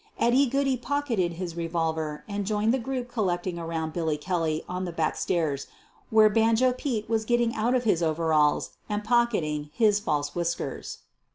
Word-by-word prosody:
Eddy 255 Hz, +4 st, +4 dB
Goodey 270 Hz, 0 st, +1 dB
pocketed 245 Hz, -9 st, -1 dB
his 170 Hz, -1 st, -5 dB
revolver 160 Hz, -2 st, -2 dB
and 205 Hz, -1 st, -3 dB
joined 215 Hz, +2 st, +2 dB
the 265 Hz, -, +1 dB
group 250 Hz, 0 st, -3 dB
collecting 185 Hz, -6 st, -2 dB
around 165 Hz, -1 st, -3 dB
Billy 160 Hz, -3 st, -1 dB
Kelly 160 Hz, -1 st, -1 dB
on 180 Hz, +1 st, -3 dB
the 175 Hz, -, -4 dB
back 160 Hz, -2 st, -1 dB
stairs, 155 Hz, -6 st, -1 dB, 0.4 s
where 220 Hz, -1 st, +6 dB
" 210 Hz, -, -2 dB
Banjo 230 Hz, +3 st, +4 dB
Pete" 245 Hz, -4 st, -3 dB
was 220 Hz, -1 st, 0 dB
getting 240 Hz, 0 st, +1 dB
out 235 Hz, +4 st, +1 dB
of 250 Hz, -, +1 dB
his 205 Hz, -7 st, +2 dB
overalls 155 Hz, -2 st, +2 dB, 0.2 s
and 210 Hz, 0 st, -2 dB
pocketing 205 Hz, -11 st, +1 dB
hii5 210 Hz, -2 st, +4 dB
false 145 Hz, -7 st, -1 dB
whiskers. 170 Hz, -1 st, -3 dB
195 Hz, 170 wpm, -27 LUFS, 165-235 Hz, 0.4 s, where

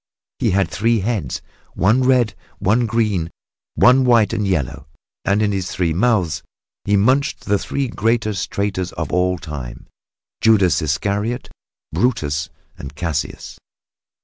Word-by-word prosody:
He -, -, +2 dB
had 95 Hz, +1 st, +2 dB
three 115 Hz, +1 st, +1 dB
heads, 100 Hz, -, -2 dB, 0.3 s
one 105 Hz, +9 st, +3 dB
red, 125 Hz, -4 st, +3 dB, 0.2 s
one 110 Hz, +5 st, +2 dB
green 110 Hz, -5 st, +1 dB
and -, -, -10 dB, 0.5 s
one 130 Hz, +1 st, +5 dB
white 120 Hz, -4 st, +4 dB
and 105 Hz, -2 st, -1 dB
yellow; 80 Hz, -10 st, -2 dB, 0.4 s
and 100 Hz, +2 st, +2 dB
in 105 Hz, -, +1 dB
his 95 Hz, -3 st, -2 dB
three 85 Hz, -3 st, 0 dB
mouths 95 Hz, -3 st, +1 dB, 0.4 s
he 100 Hz, 0 st, +3 dB
munched 130 Hz, +8 st, +2 dB
the 100 Hz, -1 st, +2 dB
three 140 Hz, -1 st, -2 dB
greatest 110 Hz, -3 st, -1 dB
traitors 95 Hz, -3 st, -2 dB
of -, -, -4 dB
all 90 Hz, 0 st, +2 dB
time 75 Hz, -7 st, -7 dB, 0.6 s
Judas 105 Hz, -6 st, +4 dB
Iscariot, 100 Hz, -, -2 dB, 0.4 s
Brutus 80 Hz, -, 0 dB, 0.3 s
and 70 Hz, +1 st, -8 dB
Cassius. 85 Hz, -2 st, -4 dB
100 Hz, 135 wpm, -20 LUFS, 90-115 Hz, 0.6 s, one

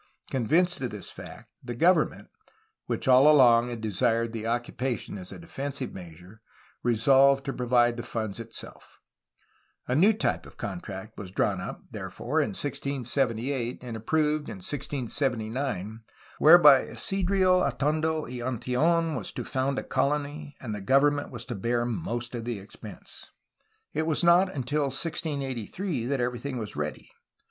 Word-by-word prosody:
Con 125 Hz, -4 st, -1 dB
vinced 175 Hz, +3 st, +3 dB
of 125 Hz, -, -1 dB
this 105 Hz, -3 st, -7 dB
fact, -, -, -11 dB
the 120 Hz, -1 st, -5 dB
government 165 Hz, +4 st, +2 dB, 0.6 s
(which -, -, -2 dB
all 130 Hz, +4 st, +7 dB
along 120 Hz, -4 st, +6 dB
had 120 Hz, -2 st, -6 dB
desired 115 Hz, +2 st, 0 dB
the 115 Hz, -1 st, -4 dB
occupation 120 Hz, 0 st, -2 dB
as 90 Hz, -2 st, -8 dB
a -, -, -8 dB
defensive 140 Hz, -5 st, -5 dB
measure) 90 Hz, +4 st, -12 dB, 0.4 s
resolved 135 Hz, +4 st, +4 dB
to 135 Hz, -, -2 dB
provide 120 Hz, -1 st, +2 dB
the -, -, -3 dB
funds 110 Hz, -3 st, -4 dB
itself. 115 Hz, 0 st, -10 dB, 0.9 s
A 125 Hz, -, 0 dB
new 180 Hz, +11 st, +5 dB
type 215 Hz, -, -1 dB
of -, -, -16 dB
contract 95 Hz, +1 st, -7 dB
was 95 Hz, -, -7 dB
drawn 95 Hz, 0 st, 0 dB
up, -, -, -7 dB
therefore, -, -, -2 dB
in -, -, 0 dB
1678, 125 Hz, -2 st, -2 dB
and 120 Hz, -2 st, -6 dB
approved 150 Hz, +5 st, 0 dB
in -, -, -6 dB
1679, 120 Hz, -2 st, -3 dB, 0.4 s
whereby 150 Hz, -4 st, +8 dB
Isidro 190 Hz, -1 st, +2 dB
Atondo 155 Hz, +2 st, 0 dB
y 125 Hz, -2 st, -7 dB
Antill6n 145 Hz, +7 st, +1 dB
was -, -, -4 dB
to -, -, -4 dB
found 135 Hz, 0 st, -1 dB
a -, -, -2 dB
colony 145 Hz, +1 st, -2 dB
and 110 Hz, -5 st, -5 dB
the 105 Hz, -, -5 dB
government 145 Hz, +6 st, +3 dB
was 120 Hz, -2 st, -5 dB
to 125 Hz, -, -5 dB
bear 120 Hz, +3 st, -1 dB
most 120 Hz, +1 st, -3 dB
of 120 Hz, -2 st, -4 dB
the 120 Hz, -1 st, -3 dB
expense. 100 Hz, +1 st, -12 dB, 0.6 s
It 160 Hz, -, -1 dB
was 160 Hz, +2 st, 0 dB
not 175 Hz, +2 st, +5 dB
until 145 Hz, +1 st, -1 dB
1683 140 Hz, -, -3 dB
that 140 Hz, 0 st, 0 dB
everything 125 Hz, +2 st, -2 dB
was 110 Hz, -3 st, -6 dB
ready. -, -, -5 dB
130 Hz, 150 wpm, -27 LUFS, 115-145 Hz, 0.9 s, whereby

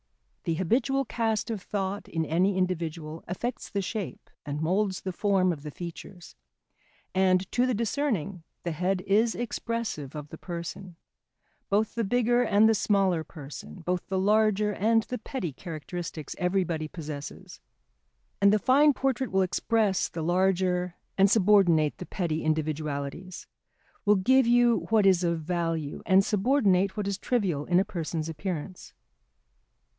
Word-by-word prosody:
The 165 Hz, -, 0 dB
habitual 260 Hz, -, +1 dB
cast 225 Hz, -1 st, -1 dB
of 215 Hz, -4 st, -4 dB
thought 200 Hz, 0 st, -3 dB
in 165 Hz, -1 st, -2 dB
any 185 Hz, +5 st, +1 dB
individual 165 Hz, -3 st, -2 dB
affects 240 Hz, +8 st, -4 dB
the 200 Hz, -1 st, -2 dB
shape 200 Hz, -1 st, -5 dB
and 145 Hz, 0 st, -4 dB
moulds 185 Hz, +4 st, 0 dB
the 185 Hz, -, -4 dB
form 190 Hz, -2 st, +2 dB
of 150 Hz, -, -9 dB
the 150 Hz, -, -6 dB
features, 175 Hz, +2 st, -9 dB, 0.8 s
and, 185 Hz, 0 st, +2 dB
to 250 Hz, +1 st, +2 dB
the 250 Hz, -, +1 dB
discerning, 210 Hz, -, -1 dB, 0.2 s
the 170 Hz, -, -2 dB
head 180 Hz, +3 st, 0 dB
is 220 Hz, +4 st, +3 dB
expressive 230 Hz, -, -4 dB
of 150 Hz, -1 st, -7 dB
the 160 Hz, -, -10 dB
person; 175 Hz, +1 st, -6 dB, 0.7 s
both 210 Hz, +2 st, +1 dB
the 230 Hz, -, -1 dB
bigger 240 Hz, +3 st, +2 dB
and 215 Hz, -2 st, +4 dB
the 225 Hz, -, +5 dB
smaller 195 Hz, -5 st, +2 dB
person, 150 Hz, +3 st, -10 dB
both 180 Hz, +1 st, -2 dB
the 190 Hz, -, -1 dB
larger 210 Hz, +1 st, +2 dB
and 225 Hz, +3 st, +2 dB
the 250 Hz, +2 st, -5 dB
petty 215 Hz, -, -4 dB
characteristics 165 Hz, -1 st, -6 dB
everybody 180 Hz, -4 st, 0 dB
possesses. 150 Hz, -3 st, -8 dB, 0.8 s
And 200 Hz, 0 st, +6 dB
the 215 Hz, -, +4 dB
fine 280 Hz, +7 st, +4 dB
portrait 265 Hz, -1 st, -1 dB
will 190 Hz, 0 st, +3 dB
express 200 Hz, +1 st, +1 dB
the 165 Hz, -, -5 dB
larger 180 Hz, 0 st, +1 dB, 0.2 s
and 195 Hz, +1 st, +5 dB
subordinate 190 Hz, -7 st, +4 dB
the 180 Hz, -, -7 dB
petty 165 Hz, -4 st, -2 dB
individualities, 155 Hz, +2 st, -3 dB, 0.6 s
will 210 Hz, 0 st, +5 dB
give 255 Hz, +6 st, +4 dB
you 240 Hz, -1 st, +3 dB
what 220 Hz, -2 st, +4 dB
is 185 Hz, -2 st, +4 dB
of 170 Hz, -1 st, 0 dB
value, 165 Hz, -3 st, -2 dB
and 190 Hz, +1 st, +5 dB
subordinate 200 Hz, -4 st, +2 dB
what 205 Hz, -1 st, -2 dB
is 200 Hz, 0 st, -2 dB
trivial 190 Hz, -, 0 dB
in 180 Hz, 0 st, +3 dB
a 195 Hz, -, +2 dB
person's 165 Hz, -5 st, -3 dB
appearance. 170 Hz, +2 st, -5 dB
190 Hz, 150 wpm, -27 LUFS, 165-215 Hz, 0.8 s, And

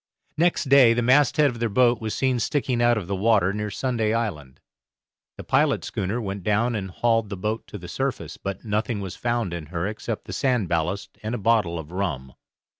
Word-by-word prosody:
Next 175 Hz, +2 st, +2 dB
day 130 Hz, -4 st, +7 dB
the 120 Hz, -, +1 dB
masthead 140 Hz, +3 st, +4 dB
of 120 Hz, -, -9 dB
their 115 Hz, -1 st, 0 dB
boat 120 Hz, +2 st, +3 dB
was 110 Hz, -1 st, -3 dB
seen 130 Hz, -2 st, +1 dB
sticking 125 Hz, 0 st, 0 dB
out 120 Hz, -1 st, +4 dB
of 105 Hz, -, -3 dB
the 100 Hz, +3 st, -2 dB
water 100 Hz, -2 st, +3 dB
near 105 Hz, 0 st, -3 dB
Sunday 115 Hz, 0 st, -1 dB
Island. 75 Hz, -, -4 dB, 0.8 s
The -, -, -7 dB
pilot -, -, +2 dB
schooner 100 Hz, +5 st, -2 dB
went 100 Hz, -3 st, -4 dB
down 105 Hz, +5 st, +1 dB
and 100 Hz, -3 st, -3 dB
hauled 115 Hz, +2 st, +1 dB
the 100 Hz, -, -5 dB
boat 105 Hz, +4 st, -3 dB
to 105 Hz, -, -8 dB
the 90 Hz, -2 st, -10 dB
surface, 135 Hz, +8 st, -3 dB
but 100 Hz, +3 st, -6 dB
nothing 110 Hz, +1 st, -1 dB
was 95 Hz, -2 st, -6 dB
found 120 Hz, -6 st, -1 dB
in 85 Hz, -3 st, -6 dB
her 85 Hz, +1 st, -3 dB
except 110 Hz, +2 st, -4 dB
the -, -, -7 dB
sand 125 Hz, -8 st, +1 dB
ballast 90 Hz, +4 st, -2 dB
and 110 Hz, +3 st, -3 dB
a -, -, -2 dB
bottle 105 Hz, -6 st, +1 dB
of 80 Hz, 0 st, -8 dB
rum. 75 Hz, -9 st, -3 dB
110 Hz, 205 wpm, -24 LUFS, 95-120 Hz, 0.8 s, day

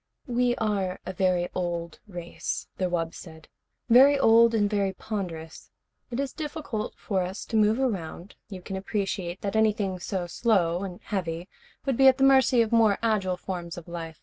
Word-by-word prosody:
"We 245 Hz, -2 st, +1 dB
are 200 Hz, -5 st, -1 dB
a 185 Hz, -, -5 dB
very 180 Hz, -1 st, +1 dB
old 170 Hz, -2 st, -3 dB
race," 175 Hz, -3 st, -5 dB
the 185 Hz, -1 st, 0 dB
wub 165 Hz, -2 st, -2 dB
said. 160 Hz, -2 st, -12 dB, 0.4 s
"Very 265 Hz, +4 st, +7 dB
old 230 Hz, -2 st, +5 dB
and 205 Hz, -2 st, +3 dB
very 200 Hz, -2 st, 0 dB
ponderous. 170 Hz, -8 st, -6 dB, 0.4 s
It 240 Hz, -, -4 dB
is 275 Hz, -1 st, -2 dB
difficult 295 Hz, -8 st, -5 dB
for 195 Hz, -3 st, -1 dB
us 185 Hz, +2 st, -5 dB
to -, -, -5 dB
move 215 Hz, +2 st, +3 dB
around. 195 Hz, -7 st, -3 dB, 0.2 s
You 185 Hz, -3 st, -8 dB
can 190 Hz, 0 st, -5 dB
appreciate 190 Hz, -2 st, -3 dB
that 200 Hz, +1 st, -3 dB
anything 210 Hz, -4 st, +1 dB
so 185 Hz, 0 st, -3 dB
slow 175 Hz, -3 st, +1 dB
and 185 Hz, -2 st, -6 dB
heavy 175 Hz, -3 st, -3 dB, 0.4 s
would 270 Hz, -4 st, 0 dB
be 270 Hz, -, +6 dB
at 260 Hz, 0 st, +6 dB
the 270 Hz, -, +1 dB
mercy 265 Hz, -3 st, +5 dB
of 220 Hz, -, -5 dB
more 225 Hz, -3 st, +4 dB
agile 195 Hz, -5 st, +1 dB
forms 175 Hz, -2 st, -6 dB
of 175 Hz, -, -9 dB
life. 165 Hz, -2 st, -7 dB
195 Hz, 175 wpm, -26 LUFS, 175-230 Hz, 0.4 s, Very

